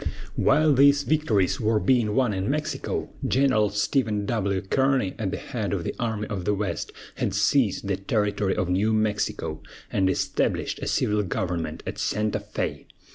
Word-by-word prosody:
While 155 Hz, -1 st, +4 dB
these 140 Hz, +1 st, +5 dB
victories 130 Hz, -, +1 dB
were 110 Hz, 0 st, +2 dB
being 115 Hz, -4 st, +2 dB
won 125 Hz, -5 st, +2 dB
in 95 Hz, +3 st, -2 dB
Mexico, 150 Hz, -1 st, -2 dB
General 130 Hz, -6 st, +3 dB
Stephen 105 Hz, 0 st, 0 dB
W. 100 Hz, -4 st, 0 dB
Kearny, 130 Hz, 0 st, +1 dB
at -, -, -1 dB
the -, -, -3 dB
head -, -, -4 dB
of -, -, -1 dB
the -, -, -3 dB
Army 110 Hz, -3 st, -1 dB
of 95 Hz, -3 st, -4 dB
the 105 Hz, +3 st, +1 dB
West, 95 Hz, -4 st, -3 dB, 0.3 s
had -, -, -1 dB
seized 115 Hz, -8 st, +2 dB
the 100 Hz, -2 st, 0 dB
territory 100 Hz, -1 st, 0 dB
of 90 Hz, -, 0 dB
New 100 Hz, +5 st, +1 dB
Mexico, 110 Hz, -1 st, -1 dB, 0.3 s
and 95 Hz, -1 st, +2 dB
established 95 Hz, -, -1 dB
a -, -, -4 dB
civil 105 Hz, 0 st, +1 dB
government 90 Hz, -3 st, -3 dB
at -, -, -5 dB
Santa 105 Hz, 0 st, 0 dB
Fé. -, -, -4 dB
105 Hz, 165 wpm, -25 LUFS, 100-130 Hz, 0.3 s, these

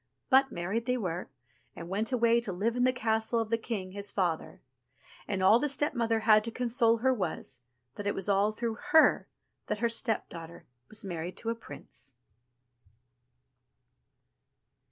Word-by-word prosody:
But 265 Hz, 0 st, +5 dB
married 200 Hz, +8 st, -3 dB
they 250 Hz, 0 st, +1 dB
were, 180 Hz, -5 st, -3 dB, 0.5 s
and 170 Hz, -, -8 dB
went 205 Hz, +6 st, -1 dB
away 235 Hz, -1 st, +3 dB
to 235 Hz, -4 st, -2 dB
live 210 Hz, +6 st, -1 dB
in 245 Hz, -, 0 dB
the 255 Hz, +1 st, +4 dB
castle 225 Hz, -2 st, 0 dB
of 225 Hz, -1 st, -3 dB
the 230 Hz, -, +3 dB
king, 200 Hz, -5 st, -4 dB
his 200 Hz, +1 st, -3 dB
father; 175 Hz, -6 st, -2 dB, 0.7 s
and 190 Hz, -2 st, -1 dB
all 210 Hz, +5 st, +6 dB
the 295 Hz, -, 0 dB
step 295 Hz, +2 st, +1 dB
mother 230 Hz, -3 st, 0 dB
had 215 Hz, -1 st, +5 dB
to -, -, -2 dB
console 235 Hz, -1 st, +2 dB
her 260 Hz, +3 st, +2 dB
was, 160 Hz, -, -3 dB, 0.4 s
that 205 Hz, -, -4 dB
it 205 Hz, -, 0 dB
was 195 Hz, -, -3 dB
all 200 Hz, +1 st, +3 dB
through 225 Hz, +1 st, -3 dB
her 315 Hz, -, +6 dB, 0.4 s
that -, -, -1 dB
her 235 Hz, -, +1 dB
stepdaughter 205 Hz, -8 st, -3 dB, 0.2 s
was 215 Hz, +1 st, -4 dB
married 175 Hz, -1 st, -5 dB
to 230 Hz, -, -2 dB
a -, -, -3 dB
prince. 135 Hz, -, -9 dB
220 Hz, 165 wpm, -30 LUFS, 195-235 Hz, 0.7 s, all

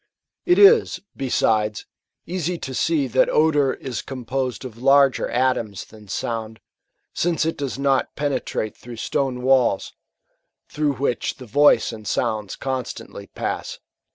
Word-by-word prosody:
It 355 Hz, -, +5 dB
is, 425 Hz, +3 st, +6 dB, 0.2 s
besides, 110 Hz, -5 st, 0 dB, 0.4 s
easy 180 Hz, 0 st, -2 dB
to 130 Hz, -, -6 dB
see 155 Hz, +1 st, +1 dB
that 125 Hz, -, +2 dB
odour 145 Hz, -4 st, +3 dB
is 125 Hz, -5 st, -5 dB
composed 130 Hz, 0 st, -4 dB
of 120 Hz, -2 st, -9 dB
larger 135 Hz, 0 st, +4 dB
atoms 120 Hz, -6 st, 0 dB
than 105 Hz, -1 st, -16 dB
sound; 110 Hz, +2 st, -4 dB, 0.5 s
since 170 Hz, -1 st, 0 dB
it 165 Hz, -, -1 dB
does 140 Hz, -2 st, -4 dB
not 135 Hz, -1 st, +1 dB
penetrate 135 Hz, -6 st, -2 dB
through 120 Hz, -1 st, -10 dB
stone 125 Hz, +1 st, -2 dB
walls, 130 Hz, -6 st, +2 dB, 0.7 s
through 150 Hz, -2 st, -1 dB
which 125 Hz, -2 st, -1 dB
the 130 Hz, -, -11 dB
voice 145 Hz, +4 st, +4 dB
and 110 Hz, -1 st, -9 dB
sounds 110 Hz, -4 st, -1 dB
constantly 130 Hz, -2 st, -5 dB
pass. -, -, -4 dB
130 Hz, 130 wpm, -22 LUFS, 115-145 Hz, 0.7 s, is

